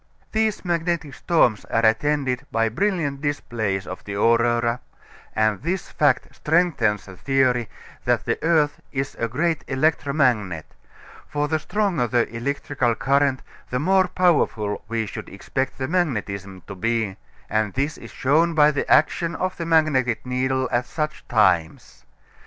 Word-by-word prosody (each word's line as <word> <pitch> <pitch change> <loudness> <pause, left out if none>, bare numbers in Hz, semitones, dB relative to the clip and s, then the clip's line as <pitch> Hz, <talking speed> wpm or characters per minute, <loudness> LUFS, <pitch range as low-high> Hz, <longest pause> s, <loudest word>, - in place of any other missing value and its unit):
These 220 -3 0
magnetic 170 -3 -1
storms 125 - +2
are 115 0 +1
attended 135 +2 +1
by 115 0 +1
brilliant 155 - -1
displays 115 -9 -2
of - - -8
the 100 - -6
aurora, 115 +2 +2 0.6
and 110 -2 +1
this 180 +3 -3
fact 145 -4 +2
strengthens 155 - +1
the 95 - -11
theory 125 -1 +1 0.4
that - - +1
the - - -1
earth 155 -3 +2
is 135 +1 -3
a 115 - 0
great 155 +7 -1
electromagnet; 130 - +1 0.6
for 145 0 -1
the 155 +1 0
stronger 185 - 0
the 120 0 +1
electrical 130 -1 -1
current 135 +1 +1 0.3
the 125 - -1
more 190 +4 +3
powerful 145 - +1
we 115 -1 -1
should - - -7
expect 135 0 -3
the 130 - -2
magnetism 100 - -2
to 100 - -8
be, 110 0 -1 0.3
and 110 -2 -1
this 140 +3 -1
is - - -10
shown 160 +5 +2
by 150 -1 +6
the 145 - -2
action 165 +2 +3
of 185 +2 -2
the 165 - -4
magnetic 140 -8 +2
needle 130 +1 0
at 120 +1 0
such 155 +1 -4
times. 95 -8 +1
135 Hz, 145 wpm, -23 LUFS, 115-155 Hz, 0.6 s, by